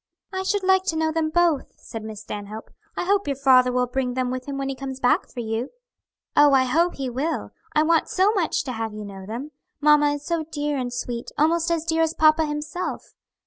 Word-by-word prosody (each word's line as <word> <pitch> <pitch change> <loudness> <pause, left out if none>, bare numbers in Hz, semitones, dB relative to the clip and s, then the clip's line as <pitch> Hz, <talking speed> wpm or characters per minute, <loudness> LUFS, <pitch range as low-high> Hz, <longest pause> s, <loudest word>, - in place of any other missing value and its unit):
"I 380 - -1
should 390 +1 0
like 380 0 +4
to 335 - 0
know 320 0 +1
them 315 -1 0
both," 335 -3 +2
said 225 - -8
Miss 215 -1 -7
Stanhope. 210 +1 -7 0.3
"I - - 0
hope 395 0 +1
your 280 - 0
father 255 -2 +5
will 250 0 +1
bring 250 0 -2
them 255 -1 0
with 255 +1 -5
him 280 -1 -4
when 275 0 -2
he 270 - -2
comes 265 0 -6
back 245 - +2
for 245 - -6
you." 225 +3 -3 0.7
"Oh, 290 -1 +6
I 265 -1 +5
hope 330 +7 +1
he 270 -1 -3
will! 270 +7 -2 0.2
I 305 - +5
want 325 0 +2
so 385 +3 +3
much 380 -7 0
to 265 - -4
have 225 -2 -4
you 210 -1 -6
know 195 -1 -9
them. 245 +8 -6 0.3
Mamma 295 0 +5
is 290 0 -9
so 335 -2 -1
dear 295 -1 -2
and 250 -2 -2
sweet, 245 -1 -4
almost 330 +2 +2
as 330 -1 0
dear 325 0 +1
as 325 0 +1
papa 310 0 +4
himself. 300 +4 -4
290 Hz, 225 wpm, -24 LUFS, 250-325 Hz, 0.7 s, Oh